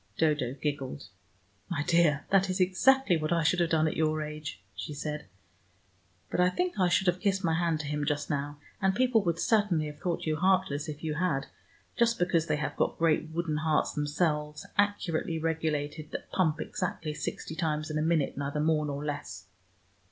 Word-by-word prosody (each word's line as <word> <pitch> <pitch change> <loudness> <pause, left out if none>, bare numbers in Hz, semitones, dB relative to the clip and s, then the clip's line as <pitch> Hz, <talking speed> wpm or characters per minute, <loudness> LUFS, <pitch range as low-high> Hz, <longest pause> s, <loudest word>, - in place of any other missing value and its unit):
Dodo 150 -5 +1
giggled. 135 -8 -3 0.6
"My 150 -5 -1
dear, 155 -3 +3
that 195 -1 +4
is 185 - -1
exactly 190 +3 +4
what 155 0 -2
I 170 -1 +2
should 180 +3 +3
have 170 -1 +2
done 160 -1 +3
at - - -2
your 155 -1 +1
age," 150 0 -6 0.2
she 150 - -6
said. 150 -1 -4 1.0
"But - - -1
I 180 0 +5
think 360 - -2
I 180 -1 +4
should 185 +2 +2
have 180 0 +2
kissed 195 -1 0
my 165 -2 +2
hand 165 -1 +1
to - - -7
him 150 0 -2
just 145 0 -1
now, 145 0 -2 0.2
and 190 -1 +2
people 245 -3 +3
would 170 -3 0
certainly 205 -6 +2
have 150 -1 -8
thought 175 0 -2
you 155 -1 0
heartless, 180 -5 +1
if 150 +1 -7
you 155 -1 -1
had, 155 -4 0 0.5
just 235 -1 +3
because 175 -3 +1
they 155 -2 +1
have 150 - -3
got - - 0
great 160 -1 +2
wooden 160 -1 -1
hearts 155 0 +1
themselves, 150 0 -1
accurately 190 -5 0
regulated, 155 -1 -2
that - - -6
pump 160 -4 +1
exactly 165 -4 -3
sixty 155 - -5
times 155 -1 -1
in 155 - -1
a - - 0
minute, 160 -3 +1
neither 140 +1 -2
more 150 0 +2
nor 145 +1 -4
less. 145 -1 -5
160 Hz, 190 wpm, -29 LUFS, 150-180 Hz, 1.0 s, I